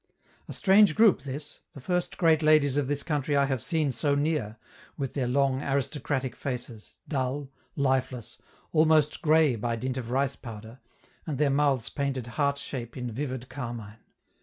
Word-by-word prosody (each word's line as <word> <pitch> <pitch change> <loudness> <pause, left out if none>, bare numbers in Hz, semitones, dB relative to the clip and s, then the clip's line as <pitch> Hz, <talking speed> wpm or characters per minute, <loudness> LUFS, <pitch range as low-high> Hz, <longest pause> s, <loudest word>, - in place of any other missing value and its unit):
A - - -6
strange 195 -3 +5
group 215 -10 +5
this, 140 +2 -7 0.2
the - - -8
first 180 +6 -2
great 165 -3 +4
ladies 155 -3 +4
of 145 -2 +1
this 145 0 -1
country 145 -2 0
I 140 - +4
have 135 -3 -1
seen 160 -2 0
so 140 +4 +1
near, 145 -7 -1 0.4
with 135 -3 -3
their 130 -3 -1
long, 135 +1 +1
aristocratic 135 -2 -2
faces, 120 -5 -6
dull, 135 -1 -2 0.2
lifeless, 130 -4 -1 0.3
almost 155 -1 +3
gray 155 -4 +4
by 115 +1 -2
dint 130 +2 -3
of 120 -3 -5
rice 135 +2 0
powder, 115 +1 -10 0.5
and 150 -4 -2
their 145 0 +2
mouths 140 -4 +1
painted 140 -4 -2
heart 140 +4 0
shape 125 -4 -6
in 125 -1 -4
vivid 130 0 -4
carmine. 120 -5 -7
140 Hz, 160 wpm, -27 LUFS, 125-150 Hz, 0.5 s, strange